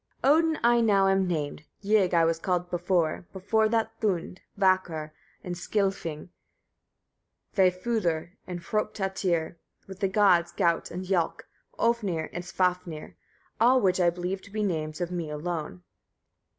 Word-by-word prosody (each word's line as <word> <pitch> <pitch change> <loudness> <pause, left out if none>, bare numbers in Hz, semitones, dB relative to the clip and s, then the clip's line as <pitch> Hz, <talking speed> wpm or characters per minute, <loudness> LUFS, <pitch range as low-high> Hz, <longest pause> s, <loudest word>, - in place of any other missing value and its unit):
54. 285 +3 +6
Odin 320 -1 +2
I 240 0 +5
now 200 -4 +4
am 195 -1 +2
named, 155 -3 -3 0.2
Ygg 200 -4 +3
I 165 -1 +5
was 165 0 +1
called 180 0 -1
before, 175 -2 0
before 215 +3 +1
that, 225 0 +1
Thund, 185 -3 -1 0.2
Vakr 185 -5 +1 0.3
and 180 - -4
Skilfing, 185 -4 -2 1.3
Vâfudr 185 -3 +1 0.2
and 180 -1 -5
Hrôptatyr, 190 -5 -1 0.3
with 190 -1 -10
the 200 - +2
gods, 185 -4 +3
Gaut 170 -4 +1
and 180 +2 -6
Jâlk, 180 -3 0 0.4
Ofnir 205 -9 0
and 175 - -4
Svafnir, 180 -3 -2 0.5
all 250 +3 +5
which 185 -4 +2
I 175 -1 +5
believe 180 +2 -3
to - - -15
be 215 +1 -2
names 155 -4 -2
of 175 0 -2
me 170 -3 -3
alone. 150 - -4
180 Hz, 140 wpm, -27 LUFS, 170-200 Hz, 1.3 s, 54